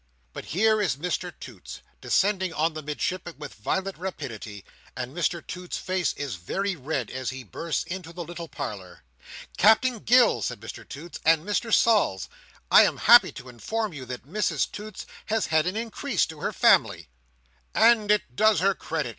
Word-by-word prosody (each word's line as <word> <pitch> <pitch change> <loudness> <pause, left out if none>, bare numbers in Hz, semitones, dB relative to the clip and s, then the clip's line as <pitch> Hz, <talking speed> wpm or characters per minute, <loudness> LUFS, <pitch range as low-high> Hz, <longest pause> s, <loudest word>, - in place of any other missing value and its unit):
But - - -7
here 215 +5 +2
is 135 - +1
Mr 180 +4 -3
Toots 115 -9 -10 0.2
descending 190 -2 +1
on 160 +1 0
the 155 - -6
Midshipman 170 +4 -4
with 145 -1 -8
violent 190 - -3
rapidity, 115 - -7 0.3
and 125 +4 -5
Mr 175 -1 -1
Toots's 180 0 -6
face 185 -1 -1
is 135 -9 -5
very 195 - -2
red 135 -4 -3
as 130 -2 -3
he 130 0 -7
bursts 165 +5 -3
into 175 -2 -7
the 175 0 -6
little 170 0 -8
parlour. 95 - -7 0.5
"Captain 220 +4 +4
Gills," 245 +2 +4
says 125 - -5
Mr 110 +2 -10
Toots, 165 +5 -8
"and 160 +1 +3
Mr 210 +3 -1
Sols, 210 - +3 0.4
I - - +9
am - - +2
happy - - +7
to 125 - -10
inform 210 - -3
you 135 -4 -8
that 125 0 -7
Mrs 210 +9 -1
Toots 210 -1 -8 0.2
has 220 0 0
had 160 +1 +2
an 185 - -2
increase 230 - -1
to 160 -1 -10
her - - -2
family." - - +3 0.7
"And 225 -2 +5
it 210 -12 +1
does 215 0 +4
her 195 +2 +3
credit!" 155 -8 -3
170 Hz, 170 wpm, -26 LUFS, 140-205 Hz, 0.7 s, I